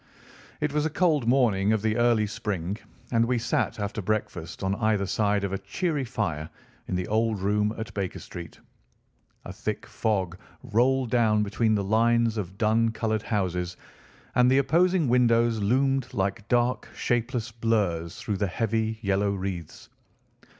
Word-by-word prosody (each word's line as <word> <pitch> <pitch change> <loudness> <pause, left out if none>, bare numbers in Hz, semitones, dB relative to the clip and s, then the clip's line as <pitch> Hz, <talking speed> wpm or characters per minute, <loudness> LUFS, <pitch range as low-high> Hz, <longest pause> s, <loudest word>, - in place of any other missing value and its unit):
It 150 -1 0
was 150 0 +1
a 160 - +1
cold 155 -6 +2
morning 110 -6 +3
of 110 -1 0
the 110 -1 +1
early 120 -2 +3
spring, 100 -2 -3 0.3
and 115 -1 +3
we 125 +1 +1
sat 120 -1 -1
after 105 +1 -3
breakfast 95 -4 -3
on 95 +1 +1
either 110 -1 +1
side 100 0 +1
of 100 -1 -2
a 95 - -2
cheery 145 - -2
fire 80 - -3 0.4
in - - -2
the 90 -1 -2
old 110 -1 +1
room 105 +2 +1
at 110 +1 -6
Baker 95 -3 -3
Street. 85 -2 -9 0.9
A - - -7
thick - - -4
fog 95 -5 -1 0.2
rolled 125 +2 +2
down 110 -3 +3
between 110 +2 +1
the 100 - 0
lines 115 +2 +2
of 95 -2 -5
dun 115 +1 +3
coloured 110 -1 -1
houses, 90 -4 -2 0.6
and 125 0 +5
the 130 - +4
opposing 165 +4 +3
windows 120 -2 +3
loomed 135 +5 +1
like 100 +3 -1
dark, 120 +1 +1
shapeless 120 -1 -1
blurs 105 -8 -1
through 105 -3 -2
the 100 0 0
heavy 110 +2 -1
yellow 100 0 +1
wreaths. 95 -4 -5
110 Hz, 155 wpm, -26 LUFS, 100-120 Hz, 0.9 s, and